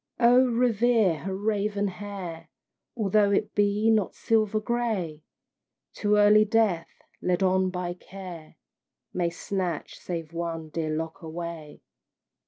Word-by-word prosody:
Oh, 245 +1 +6
revere 230 -6 +3
her 190 +6 -4
raven 205 0 0
hair! 180 -4 -7 0.5
Although 210 -1 +3
it 200 - 0
be 205 +2 +2
not 215 -4 +1
silver 215 -1 +1
gray; 215 -9 -2 0.7
Too 210 0 +1
early 210 +1 +6
Death, 215 -6 0 0.2
led 180 +1 +1
on 190 0 +3
by 180 -1 -3
Care, 180 -4 -10 0.6
May 175 -2 0
snatch 175 -1 -4
save 165 -2 -5
one 165 -2 -4
dear 160 0 -3
lock 160 +4 -4
away. 165 -2 -7
195 Hz, 120 wpm, -27 LUFS, 170-215 Hz, 0.7 s, Oh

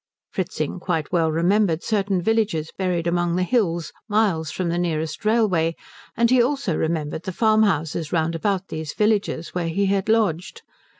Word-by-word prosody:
Fritzing 180 -3 -3
quite 165 -4 -2
well 165 -3 +2
remembered 175 +1 +2
certain 195 -4 0
villages 210 -7 0
buried 180 -3 -1
among 175 0 +1
the 185 - +1
hills, 175 -6 0 0.2
miles 200 -7 +1
from 180 +2 -2
the 170 +1 0
nearest 160 -1 -2
railway, 190 -8 +2 0.4
and 235 +1 +3
he 255 -1 +6
also 260 - 0
remembered 160 -1 -2
the 190 - -5
farmhouses 185 -8 +1
round 165 -1 +1
about 190 +3 -1
these 155 -2 -5
villages 210 -6 0
where 175 -2 -2
he 200 +4 0
had 195 +1 0
lodged. 220 - 0
180 Hz, 160 wpm, -23 LUFS, 165-210 Hz, 0.4 s, he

